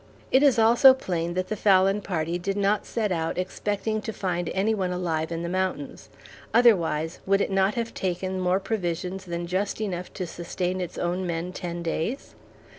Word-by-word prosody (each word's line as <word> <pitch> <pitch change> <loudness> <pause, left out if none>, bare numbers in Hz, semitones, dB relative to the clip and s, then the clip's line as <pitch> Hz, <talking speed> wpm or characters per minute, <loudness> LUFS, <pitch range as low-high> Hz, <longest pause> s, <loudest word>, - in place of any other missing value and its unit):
It 260 - +5
is 280 -4 +5
also 235 +4 +7
plain 175 -7 -3
that 185 0 -2
the 215 - -1
Fallon 195 0 +4
Party 170 -2 -2
did 195 +3 -2
not 200 +1 +1
set 215 -4 -1
out 165 -1 -1
expecting 205 +4 -2
to 220 - -4
find 175 -4 -2
any 205 +4 +1
one 190 -4 -1
alive 165 -3 -2
in 165 0 -3
the - - -2
mountains, 185 -5 -3 0.5
otherwise 170 -9 +3
would 195 0 +4
it 200 - 0
not 195 +1 +2
have 230 -1 -3
taken 185 0 -2
more 185 +1 +2
provisions 185 -2 -3
than 170 -1 -4
just 190 +5 -2
enough 185 -4 -3
to 185 - -4
sustain 180 +2 -3
its 180 - -5
own 180 +1 -1
men 170 +2 -3
ten 175 -1 -5
days? 170 - -3
185 Hz, 185 wpm, -26 LUFS, 175-205 Hz, 0.5 s, also